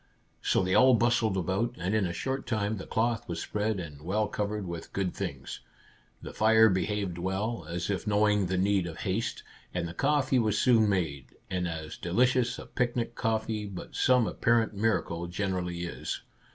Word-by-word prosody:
So -, -, +2 dB
they 95 Hz, 0 st, 0 dB
all 130 Hz, +3 st, +7 dB
bustled 115 Hz, -3 st, +2 dB
about, 95 Hz, +7 st, -1 dB
and 90 Hz, +3 st, -2 dB
in 105 Hz, -4 st, +2 dB
a -, -, -3 dB
short 130 Hz, +10 st, -3 dB
time 110 Hz, -1 st, -1 dB
the 95 Hz, -, -8 dB
cloth 115 Hz, -1 st, 0 dB
was 85 Hz, -1 st, -3 dB
spread, 105 Hz, +1 st, -1 dB
and 75 Hz, -5 st, -8 dB
well 105 Hz, +6 st, 0 dB
covered 105 Hz, 0 st, -3 dB
with 85 Hz, -2 st, -7 dB
good 95 Hz, -2 st, -1 dB
things. -, -, -5 dB, 0.6 s
The -, -, -7 dB
fire 110 Hz, +1 st, +5 dB
behaved 95 Hz, -2 st, -1 dB
well, 95 Hz, +1 st, -2 dB
as 85 Hz, 0 st, -3 dB
if 100 Hz, +1 st, -2 dB
knowing 105 Hz, -2 st, +3 dB
the 95 Hz, +1 st, -1 dB
need 95 Hz, -1 st, +2 dB
of 80 Hz, -1 st, -7 dB
haste, 100 Hz, +4 st, -2 dB, 0.3 s
and 85 Hz, -1 st, -1 dB
the 85 Hz, -, -7 dB
coffee 135 Hz, +1 st, +2 dB
was 110 Hz, -3 st, +1 dB
soon 115 Hz, -4 st, +4 dB
made, 80 Hz, -9 st, -2 dB, 0.2 s
and 90 Hz, -1 st, 0 dB
as 80 Hz, -2 st, -6 dB
delicious 125 Hz, +6 st, +2 dB
as -, -, -9 dB
picnic 120 Hz, -1 st, 0 dB
coffee, 110 Hz, -2 st, -1 dB
by 95 Hz, -3 st, -7 dB
some 125 Hz, -2 st, +3 dB
apparent 115 Hz, 0 st, +2 dB
miracle, 100 Hz, -5 st, 0 dB
generally 90 Hz, -2 st, -2 dB
is. 85 Hz, -, -5 dB
105 Hz, 180 wpm, -29 LUFS, 90-115 Hz, 0.6 s, all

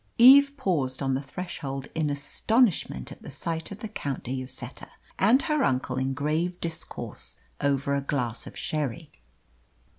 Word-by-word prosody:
Eve 280 Hz, +4 st, +8 dB
paused 145 Hz, -, 0 dB
on 135 Hz, -1 st, +1 dB
the 130 Hz, -, 0 dB
threshold 140 Hz, -3 st, -5 dB
in 155 Hz, -2 st, 0 dB
astonishment 150 Hz, -, +1 dB
at -, -, -11 dB
the -, -, -9 dB
sight 165 Hz, -1 st, -3 dB
of 200 Hz, +1 st, -9 dB
the 220 Hz, -, -3 dB
Count 145 Hz, -, -4 dB
de 125 Hz, +2 st, -3 dB
Lloseta 130 Hz, 0 st, -6 dB, 0.3 s
and 240 Hz, +8 st, +5 dB
her 300 Hz, -2 st, +1 dB
uncle 130 Hz, 0 st, 0 dB
in 130 Hz, 0 st, -1 dB
grave 160 Hz, +5 st, 0 dB
discourse 165 Hz, -1 st, -6 dB, 0.2 s
over 140 Hz, 0 st, +1 dB
a 140 Hz, -, +1 dB
glass 125 Hz, -5 st, -2 dB
of -, -, -10 dB
sherry. 150 Hz, +1 st, -3 dB
145 Hz, 155 wpm, -27 LUFS, 135-185 Hz, 0.3 s, Eve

